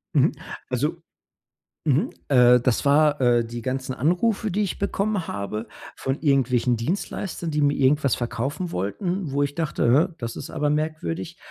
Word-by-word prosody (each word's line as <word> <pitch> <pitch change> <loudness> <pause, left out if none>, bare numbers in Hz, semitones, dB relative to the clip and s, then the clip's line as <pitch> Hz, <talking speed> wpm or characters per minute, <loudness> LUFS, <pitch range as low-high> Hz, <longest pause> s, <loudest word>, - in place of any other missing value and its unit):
Mhm, - - +5 0.4
also 150 +7 -1 0.8
mhm, 145 0 +2 0.2
äh, 125 -2 +6
das 125 -1 +1
war, 145 0 +4
äh, 120 -2 +3
die 120 +1 -6
ganzen 130 +1 -3
Anrufe, 185 - +1
die 210 +3 +1
ich 195 - -3
bekommen 200 -2 -1
habe, 105 +3 -4 0.3
von 135 +1 -3
irgendwelchen 130 -4 +2
Dienstleistern, 170 - -3
die 150 0 0
mir 145 0 +3
irgendwas 140 -1 +3
verkaufen 135 +9 -3
wollten, 165 - -2
wo 145 +1 +1
ich 140 0 -2
dachte: 150 -3 +2
„Hä, - - -16
das 115 -1 -5
ist - - -7
aber 150 0 -1
merkwürdig.” 150 - -3
140 Hz, 155 wpm, -24 LUFS, 125-165 Hz, 0.8 s, äh